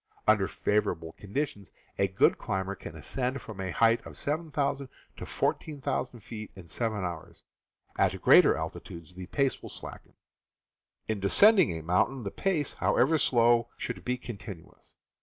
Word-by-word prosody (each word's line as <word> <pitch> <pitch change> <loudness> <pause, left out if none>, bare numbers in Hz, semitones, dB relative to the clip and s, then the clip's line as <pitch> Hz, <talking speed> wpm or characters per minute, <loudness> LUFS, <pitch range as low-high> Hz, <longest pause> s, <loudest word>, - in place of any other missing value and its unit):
Under 105 -3 +4
favorable 85 -6 -1
conditions 105 - -4 0.3
a 100 - +3
good 95 0 +3
climber 95 +1 -2
can - - -9
ascend 130 +1 -3
from 105 -4 -8
a 95 - -3
height 115 +5 +3
of - - -10
7,000 145 -3 -1
ft. - - -38 0.3
to - - -6
14,000 130 -4 -2
ft. 110 0 -8
in 95 -3 -12
seven 110 +2 -2
hours; 85 -3 -7 0.6
at - - +2
greater - - +6
altitudes 85 0 -7
the 90 0 -8
pace 140 -2 0
will - - -9
slacken. - - -11 0.9
In 110 -2 -1
descending 185 - +6
a 80 - -8
mountain, 95 +10 +1
the 100 - -4
pace, 165 -8 -1
however 155 +5 +2
slow, 120 -2 +3
should - - -5
be 125 0 -1
continuous. 100 -8 -10
110 Hz, 150 wpm, -29 LUFS, 95-135 Hz, 0.9 s, greater